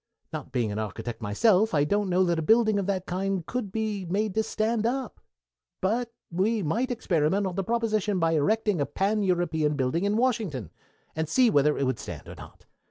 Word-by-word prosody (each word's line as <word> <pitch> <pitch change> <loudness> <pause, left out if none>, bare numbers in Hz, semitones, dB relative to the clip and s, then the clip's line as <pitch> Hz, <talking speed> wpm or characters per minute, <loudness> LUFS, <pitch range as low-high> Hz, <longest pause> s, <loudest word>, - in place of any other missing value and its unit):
Not - - -6
being 120 -5 0
an 105 - -3
architect 110 +2 -5
myself 185 - +3
I 145 - +4
don't 200 +6 0
know 185 +1 +3
that 170 -2 +1
a - - 0
building 220 +3 +4
of 195 - -2
that 190 -2 -1
kind 190 -1 -2
could 230 -3 -4
be 215 -2 -2
made 195 +4 -1
to 220 - +2
stand 220 0 -1
up, 255 0 -3 0.6
but 235 +5 0 0.2
we 200 +5 +1
might 230 - 0
experiment 190 -4 +1
on 185 - -2
the 195 +2 -2
proposition 215 -2 0
by 165 -2 +2
erecting 200 +3 +1
a 140 - 0
Pan 200 +8 0
European 170 -5 +1
building 135 +6 0
in 205 +1 +1
Washington, 215 - -1 0.4
and 160 -1 -2
see 250 +4 +4
whether 150 -2 +3
it - - 0
would 130 -3 -1
stand - - -8
or - - -8
not. - - -13
190 Hz, 200 wpm, -27 LUFS, 160-220 Hz, 0.6 s, I